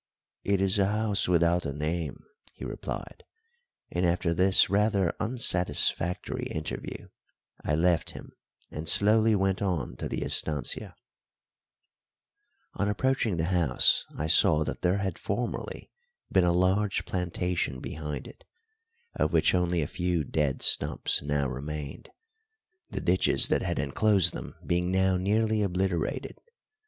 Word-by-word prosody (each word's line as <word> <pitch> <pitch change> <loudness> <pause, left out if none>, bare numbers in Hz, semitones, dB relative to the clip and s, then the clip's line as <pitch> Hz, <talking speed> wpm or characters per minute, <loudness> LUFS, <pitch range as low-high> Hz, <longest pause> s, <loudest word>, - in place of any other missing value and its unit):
"It 100 -1 0
is 95 +2 +1
a 95 - +3
house 105 -1 0
without 85 0 +2
a 70 - -3
name," 80 +3 -4 0.3
he - - -9
replied; - - -7 0.7
and 90 - -2
after 85 -1 +1
this 95 +3 +4
rather 100 -2 +1
unsatisfactory 90 -6 0
interview 80 -1 -6 0.5
I 75 - 0
left 85 +1 +1
him - - -11 0.4
and 80 +2 -2
slowly 110 +1 +4
went 95 -1 0
on 90 -10 -2
to - - -5
the - - -3
estancia. 75 -5 0 1.8
On 100 - -1
approaching 115 -3 0
the 80 - -1
house 80 -8 +3
I 75 - -2
saw 80 -1 +4
that - - -6
there 90 +2 +1
had 95 -4 -3
formerly 115 +4 -4 0.4
been 95 -2 +3
a 85 - +3
large 95 +3 +1
plantation 90 -6 -2
behind 75 0 -6
it, - - -15 0.7
of - - -1
which - - +3
only 90 -2 +1
a - - -4
few 90 -2 -1
dead 75 -2 -1
stumps - - +4
now 70 -1 -1
remained, 70 +2 -7 0.8
the - - -5
ditches 90 +1 +3
that - - +1
had - - -3
enclosed 95 +7 +2
them - - -8
being 90 +1 0
now 95 0 +2
nearly 110 +3 +1
obliterated. 95 -3 -2
90 Hz, 135 wpm, -27 LUFS, 80-100 Hz, 1.8 s, this